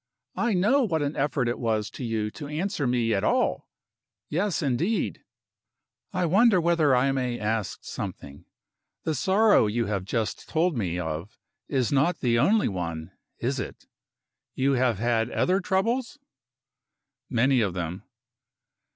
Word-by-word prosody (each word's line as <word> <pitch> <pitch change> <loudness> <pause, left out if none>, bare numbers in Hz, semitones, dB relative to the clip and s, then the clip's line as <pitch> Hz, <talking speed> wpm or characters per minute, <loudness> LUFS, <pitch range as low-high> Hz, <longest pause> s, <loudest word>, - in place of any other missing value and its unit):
I 235 -4 +1
know 220 +10 +3
what 165 - 0
an 145 +2 -2
effort 140 -2 0
it 120 - -2
was 110 -3 -1
to - - -7
you 110 -2 -2
to 145 - -8
answer 155 -1 -2
me 120 -2 +1
at 100 - 0
all. - - +1 0.6
Yes, 180 +1 0
indeed! 155 - -1 0.9
I 180 -3 0
wonder 200 +4 +5
whether 165 -5 +3
I 130 +2 +3
may 125 -3 -1
ask 110 -1 -2
something. 70 0 -7 0.6
The 160 - 0
sorrow 195 - +4
you 115 +2 0
have 100 -2 -2
just 110 +2 -3
told 165 0 +1
me 90 -7 -2
of 80 +3 -5 0.3
is 130 -4 0
not 145 +5 +2
the 115 -2 +1
only 210 - +3
one 85 -3 -4 0.3
is - - -2
it? - - -7 0.7
You 135 +1 +2
have 125 -4 +2
had 115 +1 +1
other 185 +8 +1
troubles?" 230 +9 0 1.1
"Many 125 +1 +3
of 95 -4 -1
them." 90 0 -4
130 Hz, 145 wpm, -26 LUFS, 110-175 Hz, 1.1 s, wonder